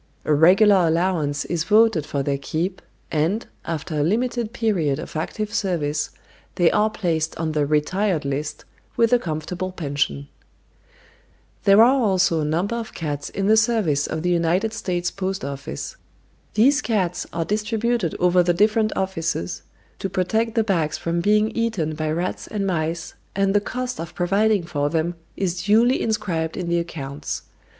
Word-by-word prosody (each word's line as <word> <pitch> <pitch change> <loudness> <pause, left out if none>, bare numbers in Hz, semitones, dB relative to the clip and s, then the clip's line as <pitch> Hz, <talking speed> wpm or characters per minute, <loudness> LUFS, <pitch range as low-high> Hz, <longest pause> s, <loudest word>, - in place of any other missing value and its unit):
A 155 - +2
regular 185 +4 +6
allowance 160 -4 0
is 170 -2 -1
voted 215 -7 +4
for 140 -1 -1
their 140 0 -1
keep, 170 +7 -3 0.3
and, 165 +9 0 0.2
after 160 -1 -4
a 150 - 0
limited 235 - 0
period 180 - 0
of 160 - -8
active 210 +7 -3
service, 155 -9 -1 0.5
they 175 -2 +4
are 215 +1 +3
placed 165 -7 -1
on 160 -1 -1
the 150 -2 0
"retired 155 +3 +1
list," 140 +2 -3 0.3
with 230 0 +3
a 245 - +6
comfortable 175 +2 -4
pension. 140 - -2 1.4
There 200 +2 +7
are 250 +3 +6
also 190 -5 +2
a - - -1
number 175 +9 0
of 230 -1 -6
cats 145 -3 -4
in 195 - -3
the 215 +2 +5
service 220 -11 +2
of 160 - -4
the 180 - +1
United 175 +6 +1
States 175 -5 -2
Post 190 -4 -3
Office. 140 - -6 0.6
These 275 +7 +4
cats 180 -6 -1
are 165 -1 -2
distributed 215 -1 0
over 180 0 +4
the 175 0 +2
different 215 +3 +3
offices 165 - -2 0.4
to 195 - -2
protect 220 +5 0
the 225 - +3
bags 170 -8 0
from 170 0 -1
being 210 +3 +3
eaten 210 -10 -1
by 155 0 -2
rats 170 +4 -2
and 205 -2 -2
mice, 165 -2 -2 0.2
and 195 0 +2
the 205 - +3
cost 250 +3 -4
of 165 +1 -6
providing 200 +2 +2
for 145 -4 -1
them 165 +2 0 0.2
is 180 -2 -1
duly 230 +5 +4
inscribed 185 -8 -1
in 180 -3 -3
the 170 0 +2
accounts. 145 -4 -5
180 Hz, 160 wpm, -22 LUFS, 155-210 Hz, 1.4 s, There